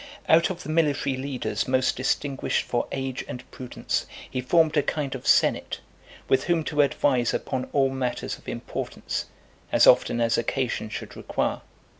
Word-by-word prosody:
Out 165 +1 +5
of 180 -1 -5
the - - -8
military 150 -4 +1
leaders 130 0 -3
most 130 0 +2
distinguished 135 +2 0
for 120 -1 -1
age 135 -1 -3
and 125 - -6
prudence, 125 -1 -3 0.2
he 130 - -3
formed 160 +4 +3
a 150 - +5
kind 145 -2 -2
of 130 - -7
senate, - - +3 0.5
with 130 0 +2
whom 170 -2 +2
to 150 -1 +2
advise 130 -4 +2
upon 130 -2 -2
all 135 -2 +3
matters 130 -2 -2
of - - -22
importance, - - -4 0.5
as - - +5
often 120 - +5
as 115 -1 +2
occasion 120 -2 -1
should 105 - -7
require. - - -2
135 Hz, 160 wpm, -25 LUFS, 125-150 Hz, 0.5 s, Out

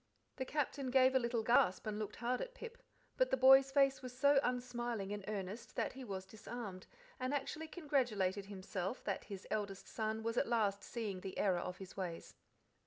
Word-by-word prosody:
The 260 - -2
Captain 280 -2 -1
gave 260 0 +5
a 260 - +5
little 235 -2 0
gasp 220 -5 +4
and 215 -1 -2
looked 215 -1 -4
hard 245 +2 -1
at - - -5
Pip; 475 -1 -9 0.4
but - - +3
the 265 - +2
boy's 270 +1 +8
face 275 -1 +4
was 250 -1 -8
so 280 +1 +6
unsmiling 240 -5 -2
and 205 -1 -5
earnest 205 +1 -5
that - - -1
he 265 0 -8
was 190 -5 -5
disarmed, 210 -1 -7 0.3
and 255 +3 0
actually 305 +3 -3
congratulated 240 - 0
himself 195 +1 -4
that - - -2
his 200 -2 -7
eldest 200 -3 -2
son 220 0 -2
was 230 +1 -1
at - - +3
last 210 -4 +1
seeing 210 -6 -4
the 190 0 -6
error 185 -3 +2
of 180 +1 -4
his 190 -1 -10
ways. 175 -3 -5
230 Hz, 190 wpm, -37 LUFS, 200-260 Hz, 0.4 s, boy's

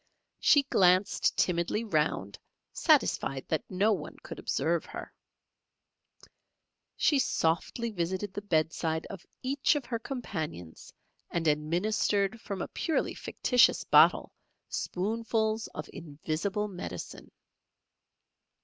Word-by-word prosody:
She 285 - +5
glanced 185 -6 +3
timidly 175 +5 +1
round; 150 - -1 0.3
satisfied 135 -1 +2
that 160 - 0
no 200 +4 +2
one 155 -6 -6
could - - -8
observe 170 0 0
her, - - -8 1.8
she 290 -3 +3
softly 225 +4 0
visited 190 +1 -3
the 205 - -4
bedside 160 -3 0
of 195 -3 -10 0.2
each 275 +3 +2
of 285 -4 -2
her 230 -2 -3
companions, 160 - -6 0.4
and 165 -1 -1
administered 195 +7 +1
from 195 -4 -4
a - - -5
purely 320 - 0
fictitious 250 -2 +2
bottle - - +5 0.4
spoonfuls 220 +2 -1
of 155 - -7
invisible 165 +6 -3
medicine. 175 - -7
185 Hz, 105 wpm, -29 LUFS, 160-220 Hz, 1.8 s, She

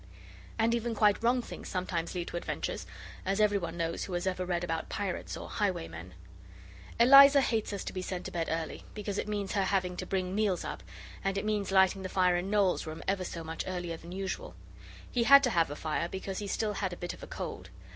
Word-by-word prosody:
And 230 +1 +3
even 235 0 -1
quite 210 -1 +4
wrong 245 +1 +2
things - - -8
sometimes 180 -2 -2
lead 175 -1 -3
to - - -4
adventures; - - -4 0.4
as 195 +2 0
every 205 -1 +4
one 170 -1 -5
knows 165 -1 -2
who 190 - -7
has 175 +1 -1
ever 185 -1 -1
read 175 -1 0
about 165 -2 -3
pirates - - -3
or - - -7
highwaymen. 80 +2 -3 0.8
Eliza 275 +3 +9
hates 225 -6 0
us 200 - -4
to - - -5
be 185 - -3
sent 185 0 -4
to - - -5
bed 165 -2 -2
early, 165 -1 -3
because 205 -1 -3
it - - -3
means 205 -2 -2
her 200 -2 +1
having 185 -2 0
to - - -4
bring 185 -1 -1
meals 205 -3 +1
up, - - -5 0.4
and 195 0 0
it 200 - -2
means 210 -2 -1
lighting 190 0 +4
the 185 - -4
fire 180 -1 +3
in 175 +2 -1
Noel's 200 -5 +2
room 155 +1 -6
ever 195 -1 +1
so 170 -2 -5
much 160 0 -4
earlier 175 -2 -3
than 170 +1 -11
usual. 190 +1 -4 0.6
He 235 -2 +1
had 280 +2 +9
to 250 - +2
have 165 -5 +2
a 145 - -5
fire 160 +2 -2
because 190 0 -4
he 205 - -4
still 210 +1 -1
had 190 -3 -2
a - - -7
bit 175 - -4
of - - -13
a - - -8
cold. - - -6
190 Hz, 230 wpm, -31 LUFS, 175-210 Hz, 0.8 s, Eliza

